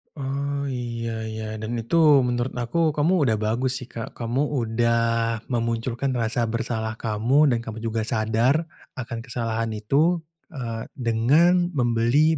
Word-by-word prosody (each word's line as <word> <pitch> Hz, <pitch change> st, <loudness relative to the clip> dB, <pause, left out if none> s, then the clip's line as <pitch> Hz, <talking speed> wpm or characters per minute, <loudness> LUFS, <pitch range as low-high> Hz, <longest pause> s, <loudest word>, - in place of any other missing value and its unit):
Oh, 140 Hz, 0 st, -2 dB
iya 120 Hz, -2 st, -4 dB, 0.2 s
iya 110 Hz, 0 st, -5 dB, 0.2 s
dan 115 Hz, +2 st, -3 dB
itu 115 Hz, +9 st, -2 dB, 0.3 s
menurut 120 Hz, +1 st, -1 dB
aku, 150 Hz, +6 st, 0 dB
kamu 155 Hz, +5 st, +2 dB
udah 110 Hz, -, +3 dB
bagus 115 Hz, +5 st, 0 dB
sih 125 Hz, -, -13 dB
Kak. 115 Hz, -1 st, -7 dB
Kamu 120 Hz, +3 st, -1 dB, 0.2 s
udah 115 Hz, +1 st, +1 dB, 0.5 s
memunculkan 115 Hz, +2 st, -1 dB
rasa 115 Hz, 0 st, 0 dB
bersalah 110 Hz, -1 st, -2 dB
kamu 120 Hz, +7 st, +2 dB
dan 115 Hz, -, +1 dB
kamu 110 Hz, 0 st, -7 dB
juga 115 Hz, -1 st, -1 dB
sadar 115 Hz, +8 st, +2 dB, 0.3 s
akan 120 Hz, -2 st, -5 dB
kesalahan 115 Hz, -1 st, -2 dB
itu, 155 Hz, +11 st, +2 dB, 0.3 s
eee, 115 Hz, -4 st, -5 dB
dengan 145 Hz, +10 st, +3 dB
membeli 125 Hz, +6 st, +3 dB
120 Hz, 135 wpm, -24 LUFS, 115-135 Hz, 0.5 s, udah